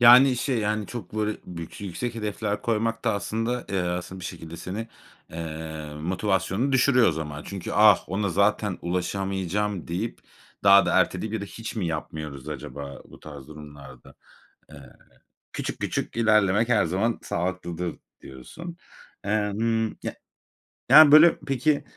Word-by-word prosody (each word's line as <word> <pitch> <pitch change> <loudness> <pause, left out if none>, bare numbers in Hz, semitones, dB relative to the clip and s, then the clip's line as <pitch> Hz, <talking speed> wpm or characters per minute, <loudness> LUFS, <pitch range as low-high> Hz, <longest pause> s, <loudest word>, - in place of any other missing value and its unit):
Yani 125 +2 +8
şey 125 0 0
yani 105 -1 -1
çok 110 -6 -8
böyle 110 0 0
bük 85 0 -8
yüksek 100 +5 -4
hedefler 105 -1 -3
koymak 115 0 -1
da 115 - +2
aslında, 115 +4 -2
eee, 95 - 0
aslında 90 +1 -4
bir - - -8
şekilde 85 -2 -7
seni, 105 +7 -5 0.4
eee, 80 -2 -6
motivasyonunu 95 - 0
düşürüyor 125 -2 +5
o - - +1
zaman. 75 -1 -5
Çünkü 95 -3 -6
"Ah, 105 -2 +6
ona 100 +2 -1
zaten 100 +1 +1
ulaşamayacağım" 95 +2 -2
deyip 95 +8 -3 0.5
daha 100 0 +7
da - - +1
erteleyip 110 0 0
ya 110 - -1
da - - -4
hiç 115 +3 -8
mi 100 -5 -1
yapmıyoruz 75 -4 -5
acaba 70 -1 -7
bu - - -14
tarz 70 -3 -11
durumlarda? 75 -4 -12 0.6
Eee, - - -12 0.6
küçük - - -4
küçük - - -3
ilerlemek 110 -1 +3
her 120 - +3
zaman 95 +7 0
sağlıklıdır 85 0 -3 0.2
diyorsun. 165 - -10 0.5
Eee, 105 0 0
hımm, 115 0 +1
ya - - -4 0.8
yani 155 -2 +10
böyle 155 +3 +8
peki 140 +2 +1
100 Hz, 145 wpm, -25 LUFS, 85-115 Hz, 0.8 s, yani